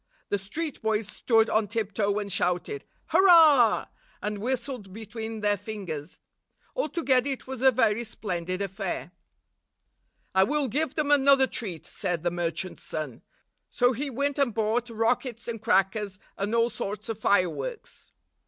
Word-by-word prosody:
The 205 - 0
street 290 - -4
boys 220 -2 0
stood 225 +1 +2
on 220 -1 +1
tiptoe 205 -1 -1
and 205 -1 -3
shouted, 180 - -1 0.2
"Hurrah!" 315 - +6 0.3
and 210 0 -3
whistled 245 -3 -3
between 220 +1 -6
their 205 0 +2
fingers. 185 -7 -6 0.6
Altogether 285 - +1
it 270 - -4
was 265 -2 -6
a 265 - +7
very 235 -2 +2
splendid 185 -4 -3
affair. 190 -3 -4 1.2
"I 190 0 +5
will 290 +7 +1
give 295 +4 -1
them 295 -2 0
another 275 -1 +6
treat," 195 -10 -5
said 170 -2 -3
the 175 - +1
merchant's 175 +1 -3
son. 150 -7 -5 0.5
So 245 +1 +2
he 280 +5 -3
went 280 +3 -1
and 250 -6 +1
bought 225 +2 0
rockets 235 +1 -1
and 230 -2 -4
crackers, 200 -1 +1 0.2
and 205 +3 -2
all 235 +1 +3
sorts 205 +2 -5
of 225 -2 -4
fireworks. 200 - -1
220 Hz, 145 wpm, -27 LUFS, 200-260 Hz, 1.2 s, a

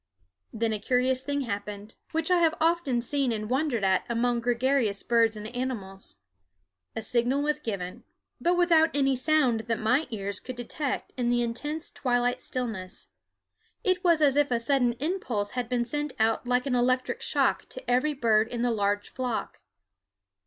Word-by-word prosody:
Then 225 0 -1
a 215 - -2
curious 255 +3 +1
thing 285 +1 -2
happened, 205 -2 -5 0.2
which 325 +2 -1
I 360 - +5
have 325 -1 +3
often 315 -7 +1
seen 275 0 0
and 215 -1 -3
wondered 260 -5 0
at 190 -1 +3
among 240 +1 +1
gregarious 240 -3 +1
birds 230 -2 +3
and 210 - -7
animals. 205 -7 -4 0.8
A 225 - -3
signal 245 +5 +1
was 300 0 0
given, 195 -9 -5 0.4
but 350 +1 +2
without 330 -2 +5
any 270 -2 +3
sound 255 -3 +2
that 230 -1 0
my 250 +9 +2
ears 200 -3 -4
could 255 - -7
detect 255 +4 -4
in 245 -1 0
the 240 0 +2
intense 295 +7 -4
twilight 245 -1 0
stillness. 220 -8 -4 0.7
It 370 -3 +1
was 335 -3 +4
as 280 -2 +4
if 290 -1 +3
a 240 -2 +1
sudden 245 0 +2
impulse 245 - -2
had 245 -2 -3
been 245 -1 0
sent 295 +3 -3
out 225 +2 +1
like 250 +1 +2
an 270 - -1
electric 255 - +1
shock - - +1
to - - -10
every 255 +5 +2
bird 225 -4 +3
in 240 0 -3
the 245 - +2
large 205 -1 0
flock. 250 -3 -3
245 Hz, 170 wpm, -27 LUFS, 225-285 Hz, 0.8 s, I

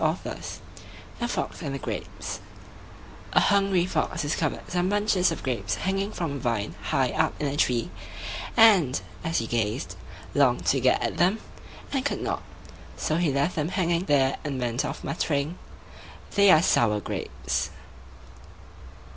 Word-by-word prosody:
THE 240 - 0
FOX - - -3
AND 140 -4 -3
THE - - -4
GRAPES - - -5 0.9
A - - +6
hungry 195 -3 +3
fox 185 -1 -1
discovered 150 +1 -1
some 180 +1 0
bunches 205 -3 +2
of 165 - -5
grapes 125 -3 -1
hanging 195 +1 -1
from 170 -7 -3
a 140 - -4
vine 115 -5 -1
high - - +1
up - - 0
a 145 -1 -1
tree, 120 -9 +1 0.7
and, 195 - +6 0.2
as 165 -1 0
he 115 - 0
gazed, 110 -5 -1 0.4
longed 135 -4 +3
to 135 - +3
get 130 0 +3
at - - -2
them, 180 +6 +3 0.5
and 270 -2 0
could 285 - -1
not; - - -2 0.6
so 155 - 0
he 170 -4 +2
left 140 +6 +1
them 155 0 0
hanging 175 -1 +1
there 135 -4 +3
and 140 -3 -3
went 120 +1 0
off - - -4
muttering, 150 +3 -1 0.7
"They're 190 -6 +6
sour 105 - +3
grapes." 65 -9 -3
150 Hz, 145 wpm, -26 LUFS, 130-185 Hz, 0.9 s, A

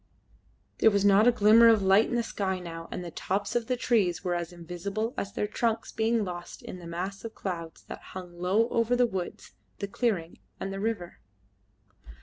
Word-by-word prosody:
There 220 - +7
was 200 -1 +1
not 200 +3 +6
a - - +8
glimmer 230 +1 +7
of 220 -3 +5
light 195 +4 +5
in - - -1
the 235 - +1
sky 195 -4 -2
now, 165 -2 -8
and 180 - -5
the 170 - -6
tops 200 +6 -2
of 235 -2 0
the 250 - 0
trees 205 -9 +1
were 180 -2 0
as 175 0 -3
invisible 180 +7 -4
as 200 - -3
their - - -1
trunks, 225 +1 -1
being 225 -1 +1
lost 175 -1 -7
in 185 - -8
the 170 - -9
mass 185 +4 -4
of 225 -1 -7
clouds 170 -4 -5
that - - -9 0.2
hung 175 -2 -9
low 195 +6 +2
over 230 +1 +2
the 245 0 +4
woods, 190 -6 -5 0.3
the 200 - -3
clearing, 195 -6 -1 0.2
and 195 0 -4
the 195 - -4
river. 205 -5 -3
200 Hz, 200 wpm, -28 LUFS, 175-225 Hz, 0.3 s, a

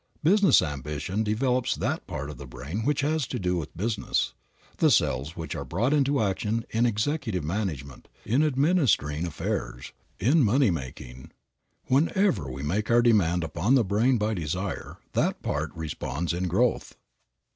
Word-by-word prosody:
Business 195 +5 +5
ambition 75 +7 -3
develops 125 +3 0
that - - -2
part 70 +2 -5
of 70 - -11
the 70 - -8
brain 65 - -6
which 145 -1 +1
has 150 -2 0
to 125 - -3
do 90 -4 0
with 80 -2 -6
business, 110 +3 -1 0.4
the - - +4
cells 70 +6 +1
which 80 -1 -5
are - - -4
brought 115 - 0
into 140 -3 +2
action 105 +3 -1
in 115 +2 +2
executive 110 - -1
management, 75 - -4 0.2
in 120 +7 +2
administering 135 - +2
affairs, 65 -5 -4 0.3
in 140 - +4
money 125 0 +3
making. 65 -4 -7 0.6
Wherever 165 - +2
we 65 +2 -6
make 100 +9 -1
our 120 0 +5
demand 90 -7 +3
upon 85 - +1
the 130 - +4
brain 110 +6 +2
by 110 0 0
desire 90 +2 -4 0.2
that - - 0
part - - -2
responds 80 0 -3
in 90 +1 -1
growth. 115 +8 0
100 Hz, 155 wpm, -26 LUFS, 80-125 Hz, 0.6 s, Business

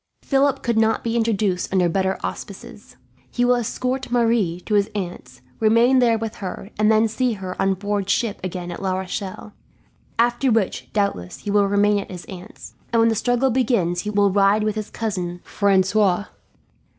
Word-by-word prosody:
"Philip 275 -1 +1
could 235 -2 +1
not 220 0 +2
be 230 0 -1
introduced 215 -5 0
under 185 -2 +3
better 190 +2 0
auspices. - - -8 0.3
He 245 - 0
will 250 - +4
escort 250 +2 -2
Marie 230 -8 +1
to 210 - -4
his 205 -1 +3
aunt's, 130 -10 -6 0.2
remain 230 +4 +4
there 235 -2 +3
with 225 -1 -5
her, 195 +1 -7
and 215 +1 +4
then 220 +1 +4
see 240 +2 0
her 190 -3 -6
on 195 0 +2
board 200 0 -2
ship 220 -1 0
again 180 -1 -5
at 175 - -7
La 190 -1 -1
Rochelle; 190 +2 -6 0.6
after 240 +2 +2
which, 220 -4 -1
doubtless, 200 - -2
he 205 - -4
will 205 -1 +3
remain 205 +1 +3
at 200 - -7
his 180 -2 -8
aunt's, 190 +3 -11 0.2
and 230 - +2
when 225 0 +5
the - - +2
struggle 245 +4 +1
begins 215 -9 +1
will 205 -1 +2
ride 200 +2 +3
with 215 0 0
his 215 0 -5
cousin 180 -6 -4
Francois. 200 0 +2
210 Hz, 175 wpm, -22 LUFS, 190-230 Hz, 0.6 s, when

